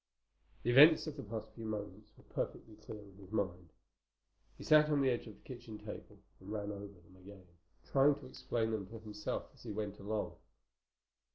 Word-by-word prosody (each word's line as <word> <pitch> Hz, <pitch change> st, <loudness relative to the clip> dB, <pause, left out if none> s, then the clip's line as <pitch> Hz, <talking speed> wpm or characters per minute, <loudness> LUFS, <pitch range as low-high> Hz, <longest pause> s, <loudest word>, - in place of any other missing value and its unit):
The 120 Hz, -, +2 dB
events 150 Hz, +5 st, +9 dB
of 155 Hz, -2 st, -4 dB
the 140 Hz, -, -5 dB
past 110 Hz, -2 st, -5 dB
few 115 Hz, -, -9 dB
moments 105 Hz, -1 st, -5 dB
were -, -, -17 dB
perfectly 110 Hz, -, -4 dB
clear 105 Hz, 0 st, -9 dB
in 100 Hz, -2 st, -16 dB
his 95 Hz, -2 st, -13 dB
mind. 90 Hz, -5 st, -1 dB, 0.9 s
He -, -, -9 dB
sat 155 Hz, 0 st, +7 dB
on 150 Hz, -1 st, +3 dB
the 135 Hz, -1 st, +4 dB
edge 120 Hz, -1 st, -2 dB
of 110 Hz, -, -9 dB
the -, -, -24 dB
kitchen 120 Hz, -4 st, -7 dB
table 105 Hz, 0 st, -8 dB, 0.2 s
and 95 Hz, +2 st, -9 dB
ran 105 Hz, -1 st, -2 dB
over 100 Hz, 0 st, -6 dB
them 90 Hz, -2 st, -18 dB
again, 95 Hz, 0 st, -13 dB, 0.4 s
trying 140 Hz, +1 st, +5 dB
to 145 Hz, -2 st, -11 dB
explain 115 Hz, -3 st, -1 dB
them 105 Hz, -4 st, -2 dB
to 115 Hz, -, -8 dB
himself 105 Hz, -1 st, -4 dB
as -, -, -19 dB
he 115 Hz, -, -6 dB
went 105 Hz, -1 st, -3 dB
along. 105 Hz, +2 st, -2 dB
110 Hz, 195 wpm, -36 LUFS, 100-120 Hz, 0.9 s, events